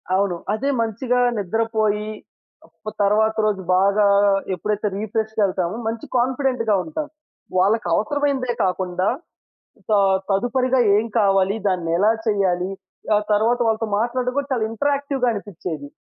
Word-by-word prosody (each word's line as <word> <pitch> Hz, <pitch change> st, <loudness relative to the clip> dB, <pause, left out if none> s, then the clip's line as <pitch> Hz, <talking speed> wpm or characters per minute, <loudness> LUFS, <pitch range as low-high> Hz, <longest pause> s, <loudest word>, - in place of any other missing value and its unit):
అవును. 195 Hz, -2 st, +1 dB, 0.2 s
అదే 255 Hz, +6 st, -1 dB
మంచిగా 235 Hz, +3 st, -1 dB, 0.2 s
నిద్రపోయి 215 Hz, +1 st, -1 dB, 0.8 s
ప్ 215 Hz, -, -2 dB
తర్వాత 215 Hz, +2 st, +3 dB
రోజు 205 Hz, -3 st, 0 dB, 0.2 s
బాగా 200 Hz, +2 st, +3 dB, 0.5 s
ఎప్పుడైతే 210 Hz, +4 st, -2 dB
రిఫ్రెష్‌గేళ్తామో 210 Hz, -3 st, -1 dB
మంచి 225 Hz, 0 st, -4 dB
కాన్ఫిడెంట్‌గా 250 Hz, -3 st, +1 dB
ఉంటాం. 310 Hz, -1 st, -5 dB, 0.5 s
వాళ్ళకవసరమైనదే 240 Hz, -, +1 dB
కాకుండా 185 Hz, 0 st, -1 dB, 0.8 s
త -, -, -1 dB, 0.4 s
తదుపరిగా 250 Hz, +6 st, +1 dB, 0.2 s
ఏం 215 Hz, -, +2 dB
కావాలి? 195 Hz, -1 st, +3 dB
దాన్ని 180 Hz, -3 st, -1 dB
ఎలా 205 Hz, +4 st, +4 dB, 0.2 s
చేయాలి? 190 Hz, -3 st, +1 dB, 0.5 s
ఆ -, -, +5 dB, 0.2 s
తరువాత 230 Hz, +4 st, +2 dB
వాళ్ళతో 220 Hz, 0 st, 0 dB
మాట్లాడడం 250 Hz, +2 st, -1 dB
కూడా 285 Hz, 0 st, -1 dB
చాలా 225 Hz, -4 st, 0 dB
ఇంటరాక్టివ్‌గా 280 Hz, +1 st, -1 dB
అనిపించేది. 175 Hz, -8 st, -6 dB
215 Hz, 110 wpm, -21 LUFS, 195-245 Hz, 0.8 s, ఆ